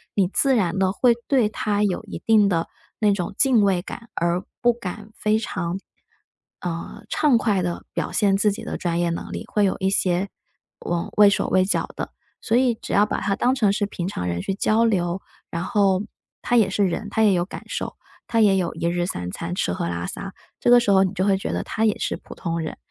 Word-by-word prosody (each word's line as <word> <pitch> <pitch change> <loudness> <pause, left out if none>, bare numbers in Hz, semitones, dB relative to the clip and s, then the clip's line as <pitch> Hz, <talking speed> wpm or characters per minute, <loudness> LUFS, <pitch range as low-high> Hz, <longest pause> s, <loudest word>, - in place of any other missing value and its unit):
你 195 -3 +3
自 270 +6 +2
然 185 -6 +1
地 190 -1 +2
会 235 +3 +4
对 250 -7 +3
他 210 -1 -1
有 195 +1 0
一 210 - -7
定 215 -3 +5
的 165 -2 0 0.3
那 210 -2 +4
种 180 -3 -3
敬 250 -6 +4
畏 190 -3 +2
感， 230 +5 -9
而 170 +2 0 0.2
不 240 - +5
敢 210 -1 -7
非 215 +1 +1
常， 185 -4 -3 0.8
呃， 170 -1 -5
畅 295 -6 +3
快 205 -5 +1
地 175 -1 -3
表 - - -2
现 200 -2 +3
自 210 +1 +3
己 200 - -6
的 - - -4
专 170 -1 -1
业 175 -1 +1
能 170 - -4
力， - - -5
会 210 - +1
有 190 - 0
一 190 0 +1
些， 190 0 +1 0.5
呃， 170 -1 -2
畏 210 -1 +8
手 200 - 0
畏 185 0 +3
脚 195 - 0
的。 - - -5 0.3
所 230 +2 +2
以 250 -2 +3
只 - - -9
要 205 +1 +5
把 - - -2
他 200 -1 0
当 250 - +2
成 220 -7 +2
是 205 0 0
平 180 -3 -4
常 90 - -3
人 85 0 -2
去 195 - -2
交 215 +3 +2
流， 185 -4 0 0.3
然 170 +1 -2
后 195 -1 +2 0.4
他 245 - 0
也 205 -4 +4
是 200 +1 +2
人， 205 +4 -3
他 220 - +1
也 205 -3 +5
有 175 0 +1
感 - - -8
受 - - -4 0.3
他， 230 -1 +1
也 200 -3 +5
有 175 -2 -1
1 170 - -2
日 175 0 0
3 90 - -4
餐， 170 - -5
吃 90 - -1
喝 85 - -2
拉 85 0 -3
撒， 195 -1 -6 0.3
这 240 - +3
个 245 - +9
时 235 - -1
候 190 -1 +6
你 190 0 -1
就 190 -1 -1
会 195 -1 +3
觉 - - -4
得 - - -1
他 220 - -1
也 215 - +1
是 - - -2
普 - - -12
通 170 -1 -3
人， 155 - -4
195 Hz, 245 characters per minute, -23 LUFS, 175-215 Hz, 0.8 s, 个